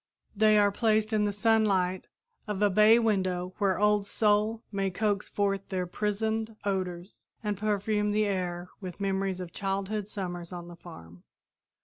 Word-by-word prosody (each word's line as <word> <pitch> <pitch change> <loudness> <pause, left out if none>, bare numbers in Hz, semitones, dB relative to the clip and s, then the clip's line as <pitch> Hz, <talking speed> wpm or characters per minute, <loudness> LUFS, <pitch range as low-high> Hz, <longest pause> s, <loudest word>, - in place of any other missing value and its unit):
They 215 0 +5
are 205 -1 +4
placed 215 +1 +1
in 210 -1 +2
the 205 - +1
sunlight 200 -4 +1 0.4
of 210 -1 -1
a 205 - +4
bay 215 +4 +6
window 185 -5 0
where 195 -2 +1
Old 210 -1 +2
Sol 215 +2 +1
may 195 -1 0
coax 205 +1 -1
forth 195 -1 -1
their 185 -2 -1
prisoned 220 +4 -2
odors 185 -2 -3 0.2
and 210 -1 -1
perfume 210 +1 0
the 215 +1 +2
air 180 -3 -3
with 185 -2 -8
memories 195 -1 -1
of 180 -1 -7
childhood 195 +1 -2
summers 175 -4 -5
on 175 -1 -7
the 175 - -10
farm. 85 - -13
200 Hz, 155 wpm, -28 LUFS, 185-210 Hz, 0.4 s, bay